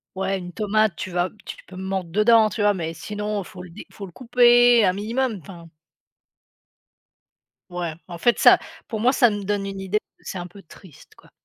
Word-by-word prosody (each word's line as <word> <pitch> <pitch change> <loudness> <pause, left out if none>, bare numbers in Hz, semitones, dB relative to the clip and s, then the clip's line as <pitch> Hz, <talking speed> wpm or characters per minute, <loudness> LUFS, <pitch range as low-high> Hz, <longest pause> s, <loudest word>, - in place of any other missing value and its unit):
ouais, 190 0 -2
une 180 0 -8
tomate, 215 0 0
tu 185 - -6
vas 175 +1 0 0.2
tu - - -7
peux 185 - -13
me 185 - -7
mordre 190 -3 -3
dedans, 215 +3 +4
tu 210 - -4
vois? 205 0 +4
Mais 165 -4 -4
sinon, 210 +3 -4
faut 180 0 -11
le 180 - -11
dé 175 +6 -11
faut 200 -2 -9
le - - -14
couper 240 +1 +5
un 185 -2 +3
minimum, 225 +4 -2
enfin 170 0 -12 2.0
Ouais, 175 -2 -4
en 175 - -8
fait, 235 +8 +2
ça, - - +7 0.3
pour 220 -2 -5
moi, 245 +4 +3
ça 245 -3 +4
nous 205 -1 -4
donne 200 0 -2
une 195 -1 -6
idée 195 +2 -1
que - - -41 0.2
c'est 190 - -6
un 175 - -6
peu 195 +3 -15
triste, 170 -1 -17
quoi. - - -21
200 Hz, 210 wpm, -23 LUFS, 180-215 Hz, 2.0 s, ça